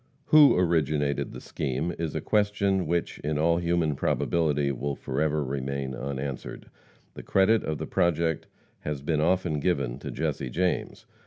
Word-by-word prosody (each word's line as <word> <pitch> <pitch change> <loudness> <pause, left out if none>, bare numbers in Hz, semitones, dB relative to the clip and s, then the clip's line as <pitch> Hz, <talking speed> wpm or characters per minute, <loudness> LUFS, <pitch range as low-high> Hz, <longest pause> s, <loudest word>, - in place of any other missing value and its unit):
Who 150 -7 +7
originated 75 -5 +1
the - - -8
scheme 75 +5 -3
is 80 -3 -3
a - - -1
question 100 -3 +1
which, 85 +1 -1
in 75 0 -2
all 85 +2 +3
human 85 -3 +1
probability, 75 -1 +1
will 70 +2 -3
forever 75 +1 -1
remain 70 0 -3
unanswered. 70 +1 -5 0.4
The - - -8
credit 100 +4 +3
of 80 -1 -2
the - - -4
project 85 -2 0 0.3
has 75 -2 -4
been 75 0 0
often 85 -2 +1
given 70 -7 -1
to - - -6
Jesse 65 - -2
James. 90 +7 -1
75 Hz, 150 wpm, -27 LUFS, 70-85 Hz, 0.4 s, Who